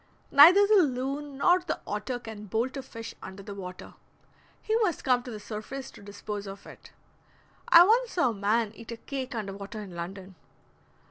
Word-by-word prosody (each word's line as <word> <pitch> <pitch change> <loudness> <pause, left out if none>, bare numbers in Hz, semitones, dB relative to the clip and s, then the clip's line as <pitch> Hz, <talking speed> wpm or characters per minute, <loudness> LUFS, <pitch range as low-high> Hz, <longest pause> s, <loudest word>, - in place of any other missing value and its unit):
Neither 350 +8 +8
the 415 -1 +5
loon 275 0 -2
nor 355 +5 +4
the 355 -3 -4
otter 210 +4 -3
can 220 -3 -9
bolt 230 +7 -2
a 270 - -4
fish 230 -3 -9
under 190 +1 -9
the 205 0 -8
water; 185 -2 -9 0.7
he 440 - -1
must 415 -8 0
come 250 -2 +3
to 245 - -10
the 215 -3 -7
surface 230 +6 -7
to - - -15
dispose 205 0 -7
of 195 0 -9
it. - - -14 0.8
(I 340 0 +9
once 470 +4 +2
saw 340 -9 +2
a - - -5
man 210 +2 0
eat 230 +1 -11
a 230 - -6
cake 260 0 -6
under 205 -3 -4
water 200 +3 -8
in 200 -4 -8
London.) 185 +2 -7
230 Hz, 190 wpm, -28 LUFS, 205-280 Hz, 0.8 s, I